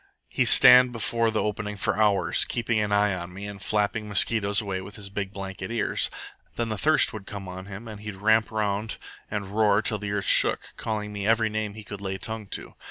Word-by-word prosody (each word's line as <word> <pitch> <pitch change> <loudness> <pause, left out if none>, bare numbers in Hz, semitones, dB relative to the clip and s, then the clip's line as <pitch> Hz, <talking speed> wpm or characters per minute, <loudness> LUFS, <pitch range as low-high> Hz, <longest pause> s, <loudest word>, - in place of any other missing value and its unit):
He'd - - +1
stand 125 0 +8
before 115 0 0
the 110 -1 -1
opening 105 0 -4
for - - 0
hours, 105 -2 +2
keeping 115 -2 -1
an 105 -1 -1
eye 105 0 +2
on 90 -1 -6
me 100 +3 -8
and 100 -1 -8
flapping 105 +1 -1
mosquitoes 100 +1 +2
away 100 -4 -3
with 100 +2 -10
his 100 -2 -6
big 100 -1 -4
blanket 95 -1 -7
ears. 115 -2 0 0.5
Then 115 -1 -2
the 110 - -3
thirst 155 +6 +4
would 105 -3 -9
come 100 -2 -7
on 95 +1 -8
him 100 +3 -9
and 105 -2 -9
he'd 105 -2 -7
ramp 110 +3 +2
round 105 0 -2 0.3
and 105 -1 -3
roar 105 +1 +2
till 105 0 -1
the 100 0 -4
earth 100 -1 -2
shook, - - +4
calling 105 -1 -4
me 100 0 -3
every 110 -1 +2
name 110 -1 -3
he 110 - -9
could 105 -1 -9
lay 95 -1 -4
tongue 110 +1 -6
to. - - -5
105 Hz, 220 wpm, -25 LUFS, 100-110 Hz, 0.5 s, stand